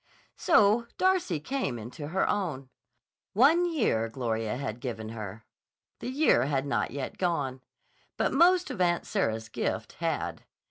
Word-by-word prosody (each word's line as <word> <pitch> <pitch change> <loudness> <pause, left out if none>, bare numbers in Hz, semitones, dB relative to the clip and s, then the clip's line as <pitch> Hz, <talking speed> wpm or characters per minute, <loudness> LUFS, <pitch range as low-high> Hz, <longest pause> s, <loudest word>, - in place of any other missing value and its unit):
So 215 +3 +4
Darcy 370 - +2
came 255 - -2
into 125 +7 -7
her 190 +5 0
own. 150 -10 -2 0.6
One 325 - +4
year 115 - +1
Gloria 115 -2 -2
had 125 -4 -4
given 110 -4 -5
her. 110 -1 -7 0.5
The - - -4
year 260 - +3
had 140 -1 0
not 140 - 0
yet 140 -1 -5
gone. 145 -8 -1 0.6
But - - +1
most 355 +5 +4
of 185 - -4
Aunt 175 -1 +2
Sarah's 110 0 -1
gift 115 - -3
had. - - -2
145 Hz, 140 wpm, -28 LUFS, -, 0.6 s, So